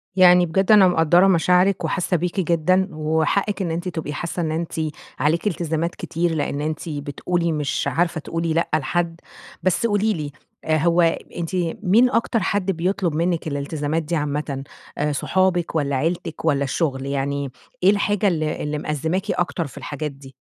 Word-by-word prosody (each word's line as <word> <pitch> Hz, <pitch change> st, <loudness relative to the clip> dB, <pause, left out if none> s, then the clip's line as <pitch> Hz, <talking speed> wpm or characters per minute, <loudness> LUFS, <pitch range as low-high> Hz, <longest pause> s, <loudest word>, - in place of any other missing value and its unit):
يعني 180 Hz, -1 st, +7 dB
بجد 190 Hz, +5 st, +1 dB
أنا 205 Hz, -3 st, +8 dB
مقدّرة 175 Hz, +2 st, +4 dB
مشاعرِك 180 Hz, +1 st, +3 dB
وحاسة 180 Hz, -1 st, 0 dB
بيكِ 180 Hz, +3 st, -2 dB
جدًا، 185 Hz, +2 st, +2 dB
وحقِك 160 Hz, +6 st, 0 dB
إن 170 Hz, -3 st, -1 dB
أنتِ 175 Hz, +3 st, -3 dB
تبقي 160 Hz, -4 st, -4 dB
حاسة 170 Hz, +3 st, -3 dB
إن 160 Hz, -2 st, -1 dB
أنتِ 165 Hz, +1 st, -3 dB, 0.5 s
عليكِ 155 Hz, +8 st, +1 dB
إلتزامات 170 Hz, -2 st, -1 dB
كتير، 170 Hz, +1 st, -1 dB
لأن 145 Hz, -1 st, -2 dB
أنتِ 155 Hz, +2 st, -3 dB
بتقولي 160 Hz, +4 st, -2 dB
مش 150 Hz, -3 st, -1 dB
عارفة 170 Hz, -1 st, 0 dB
تقولي 165 Hz, +1 st, -2 dB
لأ 170 Hz, -, 0 dB
لحد، 165 Hz, +3 st, -1 dB, 0.4 s
بس 185 Hz, +5 st, +1 dB
قولي 215 Hz, 0 st, +2 dB
لي 150 Hz, -5 st, -4 dB, 0.3 s
هو 165 Hz, +2 st, +3 dB, 0.4 s
أنتِ 170 Hz, +1 st, -3 dB, 0.3 s
مين 220 Hz, +7 st, +5 dB
أكتر 230 Hz, -1 st, +1 dB
حد 200 Hz, -2 st, 0 dB
بيطُلب 180 Hz, -1 st, -1 dB
منِك 170 Hz, 0 st, 0 dB
الإلتزامات 145 Hz, +2 st, -2 dB
دي 165 Hz, +3 st, -2 dB
عامةً 145 Hz, -2 st, -2 dB, 0.5 s
صُحابك 180 Hz, +3 st, 0 dB
والّا 140 Hz, -3 st, 0 dB
عيلتِك 165 Hz, +3 st, -2 dB
والّا 140 Hz, -3 st, +2 dB
الشغل؟ 135 Hz, -1 st, -1 dB
يعني 140 Hz, 0 st, -2 dB, 0.3 s
إيه 185 Hz, -, +7 dB
الحاجة 205 Hz, 0 st, +1 dB
ال 165 Hz, -5 st, +1 dB
ال 150 Hz, -1 st, -2 dB
مأزماكِ 160 Hz, +7 st, -1 dB
أكتر 175 Hz, -2 st, -1 dB
في 130 Hz, -, -14 dB
الحاجات 150 Hz, 0 st, -4 dB
دي؟ 135 Hz, -1 st, -14 dB
165 Hz, 160 wpm, -22 LUFS, 150-180 Hz, 0.5 s, أنا